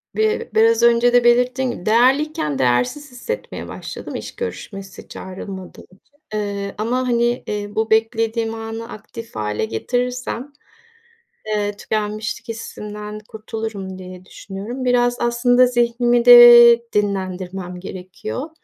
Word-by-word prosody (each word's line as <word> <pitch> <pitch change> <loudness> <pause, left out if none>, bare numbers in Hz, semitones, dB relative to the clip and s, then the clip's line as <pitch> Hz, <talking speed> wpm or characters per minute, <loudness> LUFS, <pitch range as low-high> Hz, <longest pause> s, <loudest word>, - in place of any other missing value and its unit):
bi 435 0 0
biraz 455 +1 +4
önce 235 +1 +4
de 245 -1 +5
belirttiğim 250 +2 +2
gibi, 180 - -9
değerliyken 240 - +2
değersiz 125 - 0
hissetmeye 255 - -6
başladım - - -8
iş - - -7
görüşmesi 195 - -7
çağrılmadım 190 0 -9
için. 195 +10 -26 0.2
Eee, 200 -1 -3
ama, 245 +4 -1
hani, 240 0 +1
eee, 205 -1 -3
bu 220 0 0
beklediğim 225 0 +1
anı 225 +1 -6
aktif 230 +1 -10
hâle 105 0 -2
getirirsem. 250 - -3 0.9
Eee, 210 -1 -1
tükenmişlik 215 +1 -3
hissinden 210 -2 -7
kurtulurum 215 -3 -6
diye 185 0 -11
düşünüyorum. 210 +8 -7
Biraz 245 -1 +2
aslında 245 +1 +3
zihnimi 240 0 +1
de 240 -1 +9
dinlendirmem 185 -2 -3
gerekiyor. 190 - -7
225 Hz, 115 wpm, -20 LUFS, 200-245 Hz, 0.9 s, de